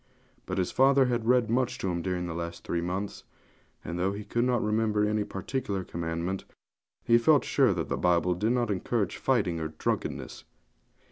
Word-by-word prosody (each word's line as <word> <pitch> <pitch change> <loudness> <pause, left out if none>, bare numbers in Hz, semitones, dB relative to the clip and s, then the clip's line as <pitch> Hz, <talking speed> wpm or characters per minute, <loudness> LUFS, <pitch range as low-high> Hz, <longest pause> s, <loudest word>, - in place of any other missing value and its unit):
But 90 - -3
his 90 -2 0
father 135 0 +5
had 120 -2 -1
read 125 -2 +4
much 125 +2 0
to 95 -7 -2
him 85 -1 -2
during 90 0 -2
the 85 - -4
last 85 0 -5
three 85 - -1
months; 95 +4 -4 0.6
and 85 +2 -4
though 95 +2 +1
he 105 +1 -6
could 120 +3 0
not 125 -2 +1
remember 105 -1 +1
any 105 0 +1
particular 100 0 -3
commandment, 85 +2 -3 0.6
he 115 0 +5
felt 145 +3 +4
sure - - +3
that - - -2
the - - -2
Bible 90 0 +2
did 105 +7 0
not 120 -3 0
encourage 100 +1 -1
fighting 100 -11 +1
or 80 - -2
drunkenness. 80 0 -3
100 Hz, 185 wpm, -28 LUFS, 90-120 Hz, 0.6 s, father